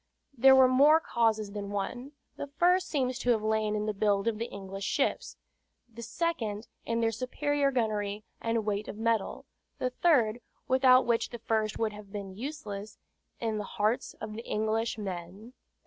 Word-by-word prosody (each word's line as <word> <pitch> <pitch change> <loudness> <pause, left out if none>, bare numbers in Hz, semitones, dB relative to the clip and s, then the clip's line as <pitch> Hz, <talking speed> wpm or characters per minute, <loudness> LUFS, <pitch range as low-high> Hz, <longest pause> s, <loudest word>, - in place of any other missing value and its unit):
There 265 +2 +7
were 260 -1 +7
more 285 +5 +6
causes 220 -7 0
than 200 -1 -5
one: 245 +7 -4 0.2
the 285 - -5
first 350 +6 +2
seems 255 -4 -1
to 245 - -2
have 225 -3 +3
lain 215 -1 +1
in 210 0 -1
the 215 - -1
build 200 0 +1
of 220 -2 0
the 230 - -2
English 195 0 -7
ships; - - -1 0.5
the 235 0 -11
second 230 -6 -2 0.2
in 230 0 0
their 225 0 +2
superior 280 +4 0
gunnery 215 -5 -1 0.2
and 230 -1 -1
weight 210 0 -2
of - - -7
metal; 225 -2 -1 0.3
the 255 - -1
third 245 -7 +2 0.3
(without 255 0 +5
which 235 -1 +1
the 240 - -7
first 220 -2 -1
would 220 -2 -1
have 205 -1 -11
been 200 -2 -6
useless) 215 -5 -6 0.4
in 220 -2 -1
the - - -3
hearts 215 +3 -1
of 215 -1 -7
the 230 +2 -7
English 220 +1 -1
men. 195 +3 -7
225 Hz, 175 wpm, -29 LUFS, 210-255 Hz, 0.5 s, There